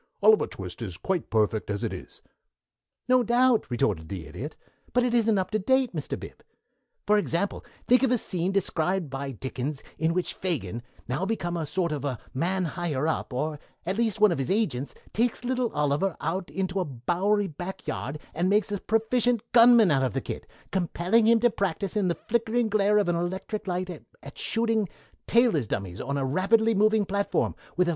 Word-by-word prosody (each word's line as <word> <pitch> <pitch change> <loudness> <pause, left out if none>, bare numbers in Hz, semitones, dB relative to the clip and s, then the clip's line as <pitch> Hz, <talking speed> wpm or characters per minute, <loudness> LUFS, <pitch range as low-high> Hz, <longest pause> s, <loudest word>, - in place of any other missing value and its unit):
"'Oliver 215 0 +6
Twist' 95 +3 -8
is 95 -7 -5
quite 180 - -2
perfect 110 -1 +1
as 100 -1 -2
it - - -2
is." - - -9 0.8
"No 255 0 +5
doubt," 245 0 +3
retorted 95 -9 0
the 95 -5 -5
Idiot, 100 - -7 0.4
"but 245 - +3
it 245 -1 +1
isn't 225 -3 +3
up 190 +2 -1
to 215 - +1
date, 260 +3 +2
Mr. 150 - -3
Bib. - - -11 0.6
For 210 +1 +4
example, 200 0 -1 0.2
think 250 0 +5
of 265 - +3
a 250 - +3
scene 185 -4 -1
described 180 -4 0
by 135 +1 -4
Dickens 130 +3 -4 0.2
in 160 +2 +1
which 180 - -1
Fagin, 120 - -3 0.3
now 130 +8 -1
become 175 -6 -2
a 160 -3 -2
sort 170 +1 0
of 140 -4 -2 0.2
man 180 +6 0
higher 160 -4 -1
up, 160 - -1
or 150 +4 -2 0.3
at 185 +3 -1
least 220 -2 0
one 210 -2 +6
of 165 - -1
his 135 - -2
agents, 145 - 0 0.2
takes 235 +2 0
little 250 -2 0
Oliver 150 +5 0
out 175 +4 -2
into 190 0 -2
a 185 - 0
Bowery 175 - 0
back 175 +3 -7
yard 140 +3 -3 0.2
and 175 +3 +1
makes 205 0 +2
a 205 - -1
proficient 225 +1 +1
gunman 235 -5 +7
out 135 -2 +3
of 130 -5 0
the - - 0
kid, - - -6 0.2
compelling 190 +4 +2
him 230 0 +6
to 240 -1 +4
practice 195 -1 -2
in 205 -3 +2
the 170 - +1
flickering 230 0 +1
glare 210 0 +3
of 205 -3 +2
an 175 - +2
electric 190 +5 -3
light 180 0 -2 0.3
at 140 - -10
shooting 225 -4 0 0.4
tailor's 225 - +3
dummies 95 -3 -4
on 140 +2 -2
a 135 - 0
rapidly 215 +10 +3
moving 215 0 +3
platform, 200 +1 0 0.2
with 180 0 +3
a - - +2
185 Hz, 190 wpm, -27 LUFS, 145-220 Hz, 0.8 s, gunman